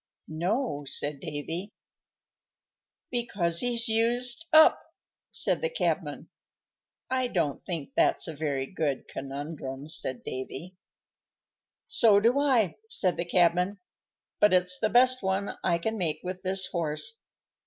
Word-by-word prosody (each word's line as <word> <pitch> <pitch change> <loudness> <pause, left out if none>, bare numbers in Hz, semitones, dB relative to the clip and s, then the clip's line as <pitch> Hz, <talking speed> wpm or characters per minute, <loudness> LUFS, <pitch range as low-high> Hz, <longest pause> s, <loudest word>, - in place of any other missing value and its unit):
"No," 175 - -1
said 145 +1 -1
Davy. 165 +6 -5 1.4
"Because 195 -9 0
he's 240 -1 0
used 240 +6 0
up," 315 0 +7 0.5
said - - +1
the 485 - 0
cabman. - - -2 0.8
"I 255 -1 +1
don't 165 - -1
think 165 -6 -4
that's - - +2
a 160 - -5
very 140 -3 -2
good 145 -4 -2
conundrum," 140 0 -6
said 130 -5 -2
Davy. 135 +7 -6 1.1
"So 215 -4 +5
do 235 +6 +3
I," 255 - +2
said 185 - +1
the 170 - -2
cabman. 180 +3 +2 0.6
"But 210 -2 +5
it's 180 0 +3
the 215 - +1
best 255 +2 +5
one 190 +1 -1
I 170 -2 +2
can 220 +5 -3
make 155 -4 -1
with 185 0 -5
this 190 0 +2
horse. 170 - -2
185 Hz, 125 wpm, -28 LUFS, 155-230 Hz, 1.4 s, up